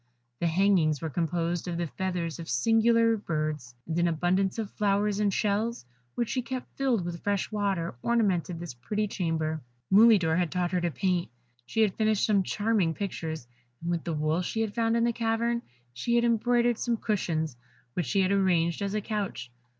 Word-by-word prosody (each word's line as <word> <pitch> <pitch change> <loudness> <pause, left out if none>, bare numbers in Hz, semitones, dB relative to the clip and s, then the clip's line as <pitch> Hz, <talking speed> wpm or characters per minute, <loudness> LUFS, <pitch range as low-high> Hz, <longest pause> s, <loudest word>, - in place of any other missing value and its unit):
The 170 - +1
hangings 165 -4 +3
were 160 -1 -4
composed 170 +2 -1
of 170 -1 -2
the 170 - -1
feathers 170 -2 -3
of 165 - -7
singular 230 0 +3
birds, 155 - -3
and 165 +1 -2
an 175 - +3
abundance 180 +4 +1
of 220 -3 -3
flowers 205 0 +1
in 210 -1 +3
shells, 210 - -1 0.3
which 235 -2 -1
she 255 - 0
kept 255 +1 -6
filled 250 -9 +1
with 170 -1 -5
fresh 205 +1 -1
water, 195 -7 -1
ornamented 190 -8 +1
this 170 -5 -6
pretty 210 - -2
chamber. 160 -5 -2 0.3
Mulidor 195 -6 +6
had 175 -3 0
taught 180 -1 -1
her 180 -1 +1
to 175 - +1
paint; 180 0 -1 0.4
she 225 - 0
had 210 -4 +3
finished 215 -2 +2
some 205 -3 +3
charming 205 -4 0
pictures, 160 - -4 0.3
and 170 +1 -3
with 170 -2 -1
the 170 - -2
wool 155 +3 0
she 225 +5 -2
had 220 -2 -1
found 230 0 +1
in 230 - +2
the 235 0 +2
cavern 235 +1 0 0.3
she 235 - -1
had 235 0 +3
embroidered 240 0 +2
some 235 -1 0
cushions, 165 - -1 0.4
which 175 -1 -2
she 195 +10 +2
had 185 +1 +2
arranged 180 -4 +2
as 200 +1 -2
a 215 - 0
couch. 205 - -4
190 Hz, 190 wpm, -28 LUFS, 170-220 Hz, 0.4 s, Mulidor